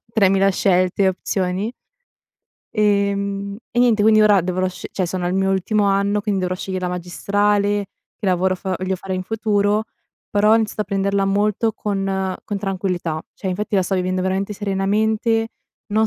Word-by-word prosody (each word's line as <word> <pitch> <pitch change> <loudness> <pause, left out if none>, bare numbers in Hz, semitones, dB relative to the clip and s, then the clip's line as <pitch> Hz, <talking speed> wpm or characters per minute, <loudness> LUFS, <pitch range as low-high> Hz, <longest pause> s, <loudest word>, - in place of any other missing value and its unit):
3000 195 -2 +4
scelte 185 0 +2
e - - +5
opzioni. 190 +3 -2 1.0
Ehm, 200 -1 0
e 240 - -2
niente 240 -3 +4
quindi 215 0 +6
ora 205 -2 +5
dovrò 185 +1 -1
scegl 185 - -6
cioè, 185 - 0
sono 180 0 -3
al 180 - -1
mio 195 0 +1
ultimo 205 +2 +1
anno, 200 +1 +1
quindi 200 -2 0
dovrò 180 0 -1
sceglier 185 0 -4
la 180 - 0
magistrale, 205 +3 0 0.3
che - - -4
lavoro 185 0 +2
f 185 - -13 0.2
voglio 185 0 -1
fare 190 +1 -6
in 185 0 -2
futuro, 210 0 +1 0.5
però 210 +1 +4
ho - - +8
iniziato 220 -1 0
a - - +1
prenderla 200 0 0
molto 210 +3 +1
con 205 -2 -3 0.4
con 205 -2 -4
tranquillità. 180 -5 -2
Cioè, 190 - -5
infatti 205 +3 -2
la 190 - +4
sto 185 +2 -1
vivendo 185 0 0
veramente 190 +2 -1
serenamente, 215 +3 0 0.4
non 220 +1 +2
200 Hz, 170 wpm, -20 LUFS, 185-210 Hz, 1.0 s, ho